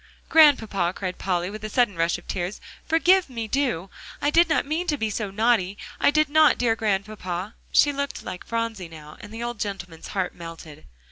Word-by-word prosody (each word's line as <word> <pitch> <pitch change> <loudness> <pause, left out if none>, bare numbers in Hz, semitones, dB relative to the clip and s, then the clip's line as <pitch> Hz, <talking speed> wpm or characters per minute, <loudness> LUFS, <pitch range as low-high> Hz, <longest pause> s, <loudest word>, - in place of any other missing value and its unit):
"Grandpapa," 220 - +4
cried 185 -2 -5
Polly, 180 0 -1
with 215 0 -8
a 215 - -4
sudden 240 -4 +2
rush 165 +1 +1
of 175 - -16
tears, 180 +3 -3 0.3
"forgive 350 +1 +4
me, 230 -3 -4
do; 225 -8 -1 0.3
I 290 - +1
did 335 +2 +5
not 315 - +2
mean 320 +5 -2
to 295 - +1
be 220 -4 -1
so 210 -1 -3
naughty. 205 -2 +1 0.2
I - - +4
did 305 +1 +3
not, 310 +1 +5
dear 235 -2 +2
Grandpapa." 200 -2 -3 0.2
She 290 - +4
looked 280 0 -4
like 180 - -7
Phronsie 230 -6 -3
now, 155 -2 -12
and 205 - -11
the 225 +1 -6
old 240 -2 -4
gentleman's 180 -5 -5
heart 190 -2 -2
melted. 165 -3 -10
215 Hz, 195 wpm, -24 LUFS, 180-275 Hz, 0.3 s, did